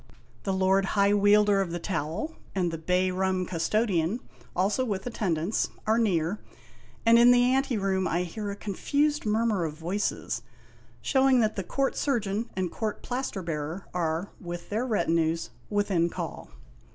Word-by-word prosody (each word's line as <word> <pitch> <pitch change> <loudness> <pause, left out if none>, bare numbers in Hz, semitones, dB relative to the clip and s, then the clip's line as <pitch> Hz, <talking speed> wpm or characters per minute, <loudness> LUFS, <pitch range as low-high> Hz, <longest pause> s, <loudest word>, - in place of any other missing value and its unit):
The 195 - 0
Lord 190 +1 +3
High 200 0 +5
Wielder 205 0 +5
of 190 - -2
the 170 - -3
Towel, 170 - -3 0.2
and 180 -3 +1
the 165 - -5
Bay 180 +3 +1
Rum 185 0 0
Custodian, 185 +2 0 0.4
also 200 +8 +1
with 200 -6 -3
attendants, 195 -5 -1 0.2
are 220 +1 +3
near, 185 -3 +1 0.7
and 230 +1 +7
in 240 +1 +7
the 245 0 +6
anteroom 195 -8 +1
I 175 +2 0
hear 205 +4 -5
a 200 - -4
confused 285 +8 0
mur 220 +2 +2
mur 210 -6 +1
of 155 -1 -4
voices, 175 +6 -2 0.6
showing 265 -2 +4
that 215 -1 +1
the 195 - -1
Court 270 +9 -1
Surgeon 225 -5 -1
and 185 -2 -1
Court 215 -2 -4
Plaster 245 -6 -3
Bearer 160 +3 -4
are, 170 +1 -1
with 175 -2 -7
their 225 +5 -1
retinues, 165 -6 +1 0.2
within 195 -5 +1
call. - - -6
195 Hz, 155 wpm, -27 LUFS, 175-220 Hz, 0.7 s, and